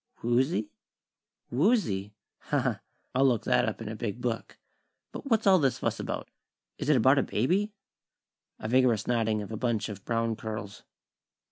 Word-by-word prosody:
"Woozy? 120 -1 +1 0.8
Woozy? 120 - +1 0.3
Ha, 145 - +3
ha! 125 -6 -1 0.3
I'll 135 +2 +4
look 120 -4 +2
that 120 - +3
up 110 - -6
in - - -7
a 110 - -4
big 110 +1 -4
book. 120 -2 -3 0.5
But 275 - -7
what's 225 -2 +2
all 190 -2 +6
this 135 -4 +2
fuss - - -2
about? - - -4 0.5
Is - - -2
it 150 - +5
about 130 +4 +5
a - - +4
baby?" 190 - +1 0.9
A - - -5
vigorous 120 -2 +3
nodding 110 -3 +1
of 100 - -9
a 110 - -3
bunch 110 -3 -1
of 100 -2 -8
brown 115 -1 0
curls. 110 -2 -6
120 Hz, 165 wpm, -29 LUFS, 110-135 Hz, 0.9 s, all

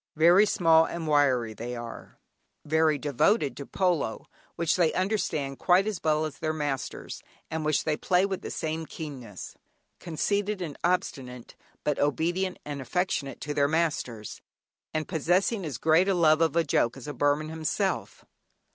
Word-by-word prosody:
Very 175 +6 +6
small 165 -5 +5
and 165 -1 -5
wiry 135 -6 +3 0.2
are 120 -1 -9 0.5
they, - - -18
very 160 -1 +3
devoted 150 - +1
to 140 - -8
polo 175 - 0 0.3
(which 170 -2 +1
they 170 -3 +3
understand 180 -8 -1
quite 185 +2 +4
as 215 -5 -3
well 155 0 +2
as 155 - -7
their 155 -1 -1
masters, 145 -4 -4 0.3
and 160 0 -2
which 150 -1 +1
they 155 - 0
play 180 +1 +2
with 195 -2 -3
the - - -6
same 160 0 -3
keenness); 130 - -8 0.5
conceited 200 +5 -1
and 165 -5 -5
obstinate; 130 -9 -2 0.3
but 150 - 0
obedient 175 +6 0
and 145 -1 -5
affectionate 145 -2 -2
to 150 - -3
their 140 -1 +2
masters, 150 -9 -2 0.5
and 155 0 -2
possessing 185 - +1
as 145 -7 -4
great 160 +6 +3
a 195 - +2
love 160 -2 +4
of 160 -1 +2
a 170 - +4
joke 125 -4 +1
as 135 - -10
a 145 - -4
Burman 145 +2 +1
himself. 160 -1 -2
155 Hz, 160 wpm, -27 LUFS, 145-175 Hz, 0.5 s, Very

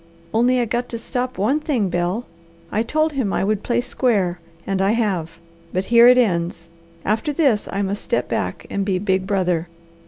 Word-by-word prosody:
"Only 245 +3 +3
I 240 - +2
got 240 +2 -2
to 230 - -4
stop 250 +2 -3
one 230 +10 +2
thing, 265 -10 0
Bel. 175 +7 -1 0.5
I 215 - +1
told 310 +6 0
him 255 -8 -1
I - - 0
would 210 +1 0
play 240 +2 0
square, 200 -9 0 0.3
and 195 -1 -1
I 195 +2 +3
have. 185 -8 -1 0.3
But 185 +1 -1
here 235 +1 +8
it 250 0 +7
ends. 170 -7 0 0.4
After 220 +8 0
this, 275 -8 +1
I 200 - -1
must 200 +1 -2
step 120 - -1
back 90 -1 -3
and 200 - -1
be 195 -2 0
big 190 -1 0
brother. 180 -4 0
210 Hz, 190 wpm, -21 LUFS, 185-245 Hz, 0.5 s, here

